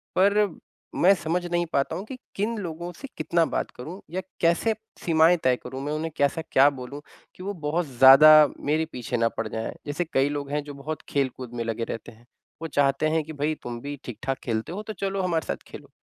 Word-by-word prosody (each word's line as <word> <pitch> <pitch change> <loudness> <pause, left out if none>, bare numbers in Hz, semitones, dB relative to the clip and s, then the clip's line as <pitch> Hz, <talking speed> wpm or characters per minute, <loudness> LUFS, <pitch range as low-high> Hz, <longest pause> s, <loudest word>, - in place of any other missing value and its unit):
पर 200 +3 +4 0.6
मैं 190 +3 +7
समझ 175 +1 -2
नहीं 175 0 0
पाता 140 +4 +1
हूँ 195 - -6
कि 255 +2 -8 0.2
किन 215 +3 -1
लोगों 175 -2 -5
से 275 - -9
कितना 170 -1 +2
बात - - -2
करूँ 165 +10 -7
या 185 +2 -2 0.2
कैसे 170 +7 +2 0.3
सीमाएँ 165 +1 +5
तय 130 -1 +4
करूँ। 130 +2 -6
मैं 150 - -2
उन्हें 160 +1 -3
कैसा 140 +3 +1
क्या 140 +2 +7
बोलूँ 135 +1 -8 0.3
कि 185 - -10
वो 200 +2 -3
बहुत 165 +3 0
ज़्यादा 140 +4 +8
मेरे 155 +2 0
पीछे 125 0 -3
ना 115 0 +2
पड़ 115 - -1
जाएँ। 110 +1 -4
जैसे 150 +4 -1
कई 135 +1 +3
लोग 145 -1 -4
हैं 150 0 -1
जो 145 - -8
बहुत 155 0 -4
खेलकूद 130 -3 -2
में 115 - -2
लगे 115 0 -2
रहते 115 +1 -6
हैं। 115 +2 -20 0.4
वो 165 - -3
चाहते 140 0 +2
हैं 160 0 +1
कि 155 +1 -8
भाई 150 +2 -1
तुम 120 -1 -5
भी 145 +2 -5
ठीक-ठाक 130 +3 -4
खेलते 115 +3 -2
हो 205 +4 -5
तो 215 - -6
चलो 195 -1 -2
हमारे 170 -5 0
साथ - - -4
खेलो। - - -11
155 Hz, 215 wpm, -25 LUFS, 135-175 Hz, 0.6 s, ज़्यादा